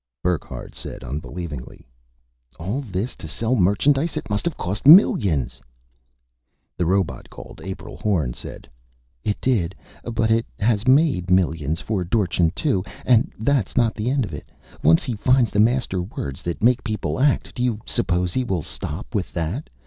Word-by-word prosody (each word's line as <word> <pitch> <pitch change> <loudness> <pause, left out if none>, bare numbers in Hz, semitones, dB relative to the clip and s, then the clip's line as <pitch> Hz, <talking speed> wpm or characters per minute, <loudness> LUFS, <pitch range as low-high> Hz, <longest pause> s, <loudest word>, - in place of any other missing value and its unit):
Burckhardt 90 -3 -3
said - - -8
unbelievingly, 75 +1 -6 0.7
"All 100 +12 -2
this 105 -1 -4
to - - -8
sell 115 +3 -1
merchandise! 135 - +2
It - - -5
must 105 - -1
have 170 -3 -1
cost 100 +8 -3
millions!" 90 - +6 1.1
The 90 - -1
robot 95 -1 0
called - - -11
April 95 +2 -7
Horn 80 - 0
said, - - -9 0.6
"It 105 - -1
did. 100 -9 +1 0.3
But 115 -1 0
it 115 +1 +2
has 110 +1 +1
made 130 - +3
millions 80 -4 +1
for 105 -4 -1
Dorchin, 90 -3 +1
too. 130 - 0 0.2
And 120 -3 +4
that's 120 -1 0
not 115 -2 +3
the 110 +3 -2
end 135 -2 +1
of 90 - -9
it. - - -8 0.3
Once 80 +1 +5
he 125 - -2
finds 125 +1 +3
the 105 - 0
master 115 -4 +2
words 70 - -6
that 85 +3 -4
make 125 +1 +4
people 110 +3 -2
act, 140 +1 +2
do 120 - -5
you 120 -4 0
suppose 90 -6 0
he 130 - +1
will 95 -9 -2
stop 85 +11 -6
with 100 -5 -2
that? 90 - -3
105 Hz, 165 wpm, -22 LUFS, 90-125 Hz, 1.1 s, millions